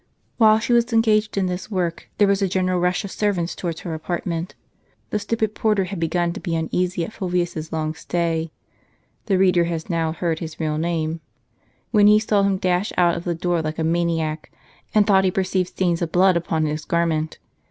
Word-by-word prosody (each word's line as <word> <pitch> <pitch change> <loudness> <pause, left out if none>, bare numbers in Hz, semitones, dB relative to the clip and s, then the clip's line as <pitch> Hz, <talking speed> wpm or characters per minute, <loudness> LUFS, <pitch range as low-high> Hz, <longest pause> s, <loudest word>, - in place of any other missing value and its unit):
While 220 -2 +6
she 230 +2 0
was 235 0 +3
engaged 220 -2 +2
in 195 - +2
this 180 +2 -4
work, 180 -5 -2
there 205 - +4
was 200 0 +2
a 195 - +2
general 185 -1 0
rush 180 +3 +1
of 195 - -7
servants 190 -5 -1
towards 170 -3 -4
her 170 - -5
apartment. 170 +1 -4 0.6
The 210 - 0
stupid 220 0 -1
porter 210 -3 +1
had 185 0 -5
begun 170 +1 0
to 210 - -6
be 170 -3 -3
uneasy 175 +2 -1
at 215 - -10
Ful 185 -3 -4
vius's 175 -3 -2
long 155 -1 -2
stay 165 -1 -2 0.8
(the 195 -3 +2
reader 180 -2 +4
has 170 +1 -4
now 165 -1 0
heard 165 -1 -2
his 160 -2 -7
real 155 -1 -1
name), 165 -1 -2 0.7
when 210 -3 +5
he 210 0 +7
saw 215 -1 +2
him 195 -1 +2
dash 185 +2 0
out 175 -1 +4
of 170 - -6
the 175 -1 -1
door 175 0 0
like 155 0 -4
a 160 - -1
maniac, 165 -2 -1 0.4
and 210 -1 +5
thought 195 -2 +4
he 190 - +3
perceived 185 -1 0
stains 175 -2 0
of 170 -1 -2
blood 185 0 +4
upon 165 -2 0
his 155 0 -3
garment. 160 -2 0
175 Hz, 205 wpm, -22 LUFS, 165-195 Hz, 0.8 s, he